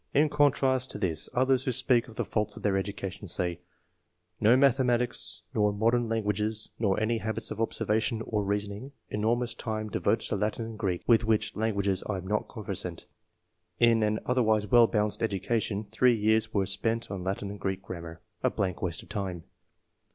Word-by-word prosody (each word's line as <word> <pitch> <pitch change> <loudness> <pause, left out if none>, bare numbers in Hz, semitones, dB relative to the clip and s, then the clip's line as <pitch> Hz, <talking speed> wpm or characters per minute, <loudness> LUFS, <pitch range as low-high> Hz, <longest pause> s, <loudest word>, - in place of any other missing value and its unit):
In 150 +2 +5
contrast 135 -3 +2
to - - -5
this, 85 -6 -2
others 130 +1 +2
who 130 - +1
speak 120 0 +2
of 115 - -13
the - - -2
faults 105 -1 -1
of - - -10
their 100 -2 +2
education, 100 0 -4
say: 85 0 -1 0.3
— - - -47
" - - -41
No 115 +4 +6
mathe 135 -1 +4
matics, 125 -1 -1
nor 105 -1 +2
modern 115 +3 +1
languages, 110 0 -1
nor 100 -4 +1
any 110 +1 0
habits 110 +1 -3
of - - -3
observation 110 0 0
or 105 -2 -1
reasoning." 105 +6 -3
— - - -46
"Enormous 115 +3 0
time 110 -1 -4
devoted - - +1
to - - 0
Latin 105 +3 -1
and 110 -1 -8
Greek, 95 -5 -1
with 115 -1 +5
which 110 -1 +1
lan 110 0 0
guages 100 -1 +1
I 100 - 0
am 95 - -7
not 105 +2 -1
conversant." 95 -6 -5 0.2
— - - -49
" 90 0 -47
In 115 -1 +5
an 105 0 +1
other 125 0 +2
wise 110 -2 +2
well 115 +3 +6
balanced 105 -1 0
education, 105 0 -1
three 125 +2 +4
years 110 +1 +2
were 100 -2 +1
spent 115 +4 -1
on 95 -2 -4
Latin 100 +1 -3
and 100 - -8
Greek 95 0 -3
grammar 85 -2 -8
— - - -40
a - - +4
blank 90 -3 -2
waste 85 -3 -2
of - - -18
time." 95 -5 -4
110 Hz, 205 wpm, -28 LUFS, 100-115 Hz, 0.3 s, No